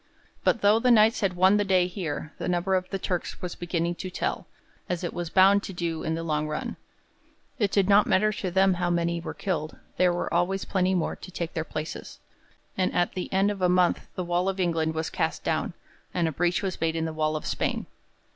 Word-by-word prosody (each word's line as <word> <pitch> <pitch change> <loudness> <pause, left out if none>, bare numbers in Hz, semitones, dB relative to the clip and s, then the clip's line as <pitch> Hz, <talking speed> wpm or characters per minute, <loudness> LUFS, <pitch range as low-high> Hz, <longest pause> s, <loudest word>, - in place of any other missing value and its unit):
But 235 - +2
though 205 +2 +5
the 250 - +2
Knights 225 -1 +5
had 195 -4 0
won 190 +3 +5
the 205 - +2
day 185 -2 +3
here, 165 -4 -5
the - - -3
number 180 +2 0
of 185 -1 0
the 195 - -2
Turks 180 -2 -3
was 180 -2 -5
beginning 170 -1 -2
to 185 - -5
tell, 180 - -3 0.4
as 180 -1 -2
it 175 - -3
was 175 -1 -4
bound 195 +2 +5
to 195 - -7
do 170 -2 -3
in 160 - -1
the 165 - -4
long 155 -2 -1
run. 150 0 -4 0.8
It 205 -3 +2
did 195 -1 +2
not 205 +1 +5
matter 215 +3 +3
to 195 -2 -3
them 190 +1 +4
how 175 0 -1
many 170 0 0
were - - -6
killed, 160 -6 -3 0.2
there 180 -1 +4
were 175 - -2
always 180 +3 +1
plenty 190 -1 +1
more 175 - -1
to - - -10
take 170 -2 -4
their 160 - -1
places, 155 0 -6 0.6
and 185 -1 +1
at 175 - +1
the 185 - -5
end 195 +2 +3
of 200 -2 -6
a 180 - +3
month 180 -1 +2
the 185 - -2
wall 175 +2 0
of 195 0 -3
England 165 -3 0
was 160 0 -2
cast - - -1
down, - - -1 0.4
and 170 -2 +2
a - - -1
breach 175 +5 0
was 190 -2 -3
made 165 0 +1
in 160 0 -1
the 160 - -3
wall 155 0 0
of 155 - -4
Spain. - - -1
180 Hz, 230 wpm, -26 LUFS, 165-190 Hz, 0.8 s, though